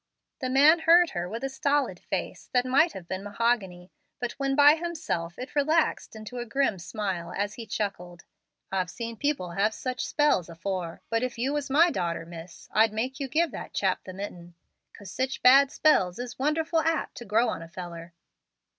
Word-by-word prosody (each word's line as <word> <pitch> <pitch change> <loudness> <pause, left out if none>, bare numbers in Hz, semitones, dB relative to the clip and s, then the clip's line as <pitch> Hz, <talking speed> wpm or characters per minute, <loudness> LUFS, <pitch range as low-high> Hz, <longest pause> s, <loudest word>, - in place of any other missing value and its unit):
The 255 - -2
man 290 +6 +6
heard 340 +1 +5
her 175 0 -3
with 230 +5 -5
a - - 0
stolid 285 +2 0
face - - -5
that 250 0 +3
might 280 +6 +3
have 180 -3 -9
been 185 +1 -4
mahogany, 200 -4 -1 0.3
but 245 -1 -2
when 275 0 0
by 290 +1 +8
himself 315 - -3
it 255 +4 -8
relaxed 310 -3 +1
into 220 +3 -7
a 240 - -4
grim 250 -5 0
smile 180 -2 -4
as 205 +1 -1
he 230 -1 -9
chuckled, 180 -4 -4 0.5
"I've 185 -2 -1
seen 230 +4 -6
people 275 -9 -1
have 205 +5 +1
such 255 +2 -3
spells 295 - +2
afore; 170 0 -5
but 230 0 +1
if 255 -1 -3
you 260 +5 -1
was 295 -2 -2
my 330 +6 +5
darter, 170 - -2
miss, 170 +1 -11
I'd 220 0 +4
make 255 +5 -3
you 275 - -2
give 320 +3 +1
that - - -8
chap 190 -2 +1
the 185 - -9
mitten, 175 -3 -8 0.4
'cause 200 -4 -10
sich 260 +1 -3
bad 270 +2 +7
spells 185 - +3
is 245 0 -7
wonderful 320 +4 +1
apt 320 0 0
to 240 - -8
grow 225 +3 +2
on - - -4
a 165 - -9
feller." 170 -1 -9
230 Hz, 190 wpm, -27 LUFS, 185-280 Hz, 0.5 s, by